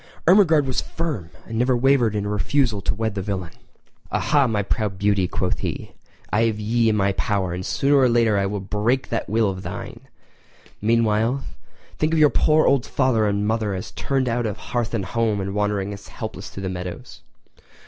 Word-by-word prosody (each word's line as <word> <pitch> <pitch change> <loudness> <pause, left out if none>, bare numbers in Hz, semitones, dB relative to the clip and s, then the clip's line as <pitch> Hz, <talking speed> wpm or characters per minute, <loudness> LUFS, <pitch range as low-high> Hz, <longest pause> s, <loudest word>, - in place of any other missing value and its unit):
Ermengarde 165 -5 +5
was 130 - -1
firm, 145 - -4 0.2
and 115 0 -4
never 125 0 +2
wavered 125 -4 +3
in 105 - -1
her 105 - -3
refusal 110 0 +1
to 95 - -1
wed 110 0 -2
the 100 - -3
villain. 95 -3 -4 0.6
"Aha, 145 -3 +2
my 105 -3 0
proud 100 -1 -2
beauty," 100 -2 +2
quoth 90 0 -2
he, - - -4 0.4
"I 110 +2 +3
have 110 -2 -1
ye 115 +2 +2
in 105 - +1
me 100 -1 +2
power, 95 -4 -1
and 90 +1 -4
sooner 140 +8 +2
or 130 -2 +5
later 115 -2 +3
I 100 0 +1
will 100 +1 -3
break 105 +7 -1
that 115 - -2
will 110 +1 +2
of 95 -1 -7
thine! - - -7 0.8
Meanwhile 115 +3 +2 0.6
think 155 +1 +1
of 160 - +3
your 150 -2 +6
poor 155 0 +3
old 135 -2 +2
father 125 -6 +2
and 100 0 0
mother 110 -2 0
as 95 - -6
turned 135 -2 -1
out 120 -1 0
of 105 0 -4
hearth 120 +1 -3
and 100 -5 -2
home 110 +1 0
and 95 0 -3
wandering 105 -1 -1
helpless 100 - -8
through 100 - -8
the 95 - -2
meadows!" 90 -1 -7
110 Hz, 195 wpm, -22 LUFS, 100-125 Hz, 0.8 s, your